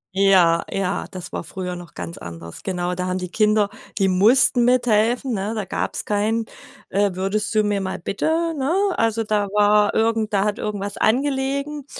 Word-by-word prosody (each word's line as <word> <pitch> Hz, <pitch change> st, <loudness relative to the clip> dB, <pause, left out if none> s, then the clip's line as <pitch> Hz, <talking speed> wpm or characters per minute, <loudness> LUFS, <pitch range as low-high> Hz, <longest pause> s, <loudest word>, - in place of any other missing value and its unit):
Ja, 185 Hz, -4 st, +4 dB
ja, 195 Hz, 0 st, -2 dB
das 185 Hz, -2 st, -8 dB
war -, -, -5 dB
früher 180 Hz, -2 st, -5 dB
noch 175 Hz, -3 st, -11 dB
ganz 170 Hz, -, -7 dB
anders. 85 Hz, -1 st, -9 dB
Genau, 180 Hz, -1 st, -2 dB
da 180 Hz, 0 st, -3 dB
haben 185 Hz, 0 st, -1 dB
die 180 Hz, -1 st, -5 dB
Kinder 215 Hz, -1 st, +2 dB, 0.3 s
die 195 Hz, -2 st, +2 dB
mussten 240 Hz, +6 st, +4 dB
mithelfen, 245 Hz, +1 st, +2 dB
ne, 205 Hz, +2 st, -2 dB
da 215 Hz, -, -2 dB
gab's -, -, -3 dB
kein: 215 Hz, +2 st, 0 dB, 0.5 s
Äh, 200 Hz, 0 st, +1 dB
„würdest 205 Hz, +4 st, -2 dB
du 215 Hz, -, +4 dB
mir 205 Hz, -1 st, 0 dB
mal 190 Hz, -1 st, -3 dB
bitte“, 185 Hz, +3 st, -4 dB, 0.3 s
ne? 275 Hz, +5 st, 0 dB, 0.2 s
Also 225 Hz, 0 st, +1 dB
da 210 Hz, -1 st, 0 dB
war 210 Hz, 0 st, +4 dB
irgend 225 Hz, -1 st, +1 dB
da 195 Hz, 0 st, +3 dB
hat 210 Hz, +1 st, -1 dB
irgendwas 205 Hz, -1 st, -4 dB
angelegen 275 Hz, +3 st, 0 dB
205 Hz, 175 wpm, -22 LUFS, 190-225 Hz, 0.5 s, Ja